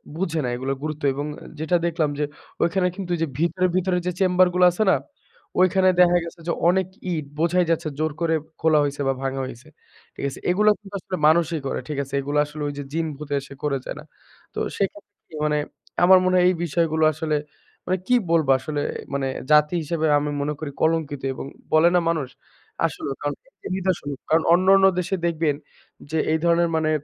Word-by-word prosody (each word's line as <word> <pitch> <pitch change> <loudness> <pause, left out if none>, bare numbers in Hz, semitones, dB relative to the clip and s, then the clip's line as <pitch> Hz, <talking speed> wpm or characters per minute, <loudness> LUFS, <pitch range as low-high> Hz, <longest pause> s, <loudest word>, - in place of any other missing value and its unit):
বুঝে 165 -3 -1
না - - -1
এইগুলার 130 +2 -3
গুরুত্ব 155 -1 -4
এবং 145 - -3
অ্যা - - -12
যেটা 165 +3 +2
দেখলাম 165 -3 0
যে, - - +1 0.4
ঐখানে 180 +2 +2
কিন্তু 195 -3 -6
ওইযে 165 -1 -1
ভিতরে, 175 +2 +1
ভিতরে 185 0 +1
যে, 180 - 0
চেম্বার 185 -1 +4
গুলা 180 - +5
আছে 195 +5 0
না? - - +5 0.6
ওইখানে 185 +1 +4
দেখা 175 0 +5
গেছে 170 +1 -9
যে, - - +1 0.2
অনেক 190 0 +2 0.2
ইট, 155 -4 -2
বোঝাই 175 +2 +2
যাচ্ছে 165 -1 0
জোর 155 0 0
করে 165 -1 +2 0.3
খোলা 160 -2 +4
হইছে 145 0 -2
বা 135 - +2
ভাঙা 135 0 -2
হইছে। 130 -1 -10 0.5
ঠিক - - -4
আছে? 135 - -9
এইগুলা 210 +4 +4
কিন্তু 205 -1 -15
আসলে 185 0 -5
মানুষই 165 0 +3
করে। - - -2
ঠিক 150 -2 -4
আছে? 135 0 -13
এইগুলা 145 +2 0
আসলে 150 +1 -9
ওইযে 145 0 -5
জিন-ভুতে 150 -3 -3
এসে 140 0 -11
করে 145 -2 +1
যায় - - -5
না। - - -10 0.5
তো - - -4 0.2
সেক্ষেত্রে 205 +1 -3 0.2
কি? - - -21
মানে 150 0 +1 0.5
আমার 185 +1 +8
মনে 185 0 +2
হয় 180 - +4
এই 185 - +1
বিষয়গুলো 160 0 +1
আসলে, 155 0 -1 0.5
মানে 185 +1 0
কি 250 - +4 0.2
বলবো? 160 -5 +3
আসলে 145 +1 -3 0.3
মানে, 140 -1 0 0.2
জাতি 150 +1 +5
হিসেবে 160 +1 -2
আমি 145 0 -1
মনে 145 +1 -1
করি 155 -2 -5
কলঙ্কিত 160 -3 0
এবং 130 - -7 0.3
বলে 155 +2 +6
না - - +6
মানুষ? 155 -5 -1 0.6
আসলেও 140 - -3
কারণ, 145 0 -1 0.2
এটা - - -10
নিদর্শন। 185 -6 -1 0.2
কারণ 160 +1 +3
অন্যান্য 190 +2 +5
দেশে 180 +2 -1
দেখবেন 160 -3 +1 0.6
যে, 160 - 0 0.2
এই - - +3
ধরনের 170 0 +3
মানে 155 -1 +1
160 Hz, 195 wpm, -23 LUFS, 150-180 Hz, 0.6 s, আমার